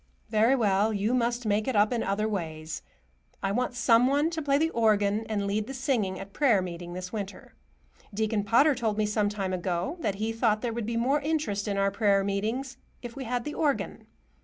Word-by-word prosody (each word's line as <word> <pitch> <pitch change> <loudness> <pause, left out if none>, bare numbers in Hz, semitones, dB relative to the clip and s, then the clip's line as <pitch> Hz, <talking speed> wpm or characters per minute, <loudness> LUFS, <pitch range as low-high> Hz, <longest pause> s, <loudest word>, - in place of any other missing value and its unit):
Very 225 +4 +4
well, 210 -3 +2
you 210 +3 0
must 240 -1 0
make 210 0 +1
it 260 - 0
up 210 +3 +4
in 235 - 0
other 200 +2 0
ways. 160 -6 -4 0.6
I 195 - +1
want 245 +3 -1
some 245 0 +4
one 290 +4 +2
to 325 -1 -3
play 280 -1 +2
the 320 +2 +1
organ 215 -1 +2
and 205 -2 -1
lead 205 +2 -1
the 270 - -6
singing 240 -8 -1
at 195 0 -9
prayer 250 -9 +3
meeting 175 -1 -6
this 180 +2 -6
winter. 205 -2 -6 0.6
Deacon 215 0 0
Potter 240 +9 +4
told 225 -5 -1
me 215 - +2
some 210 0 +1
time 195 -2 -3
ago 180 - -2
that 210 - -1
he 215 +3 -2
thought 225 -1 +1
there 235 -2 -1
would 230 -2 -3
be 230 0 -1
more 270 +5 +2
interest 290 -10 -1
in 200 -1 -1
our 195 0 +2
prayer 200 -1 +2
meetings 225 +7 -2 0.3
if 240 -1 -7
we 270 -1 -6
had 245 +1 -2
the 295 - -5
organ. 290 -4 -1
215 Hz, 210 wpm, -28 LUFS, 200-250 Hz, 0.6 s, Very